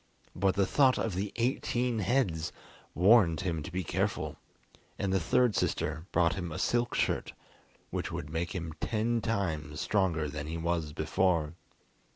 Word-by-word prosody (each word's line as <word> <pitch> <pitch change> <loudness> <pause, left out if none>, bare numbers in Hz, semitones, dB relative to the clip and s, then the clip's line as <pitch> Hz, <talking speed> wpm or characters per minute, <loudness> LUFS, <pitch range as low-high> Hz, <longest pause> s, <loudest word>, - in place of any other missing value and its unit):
But 95 0 +2
the 100 0 +3
thought 130 +4 +4
of 110 - -1
the 95 +3 -2
eighteen 120 -1 0
heads 95 - +1 0.4
warned 90 -3 +5
him 85 -4 -2
to - - -7
be 90 +1 -2
careful, - - -1 0.6
and 95 -1 -1
the 95 - +3
third 120 +7 +2
sister 80 +3 -1
brought 85 -1 +3
him 85 -3 -4
a - - -4
silk 120 0 +1
shirt - - 0 0.6
which - - -3
would 75 - -5
make 85 +3 -2
him 85 -3 -4
ten 115 +1 0
times 80 -9 -2
stronger 90 -7 +1
than 75 0 -5
he 80 +1 -3
was 85 -2 -1
before. 80 +1 +1
90 Hz, 160 wpm, -30 LUFS, 80-110 Hz, 0.6 s, warned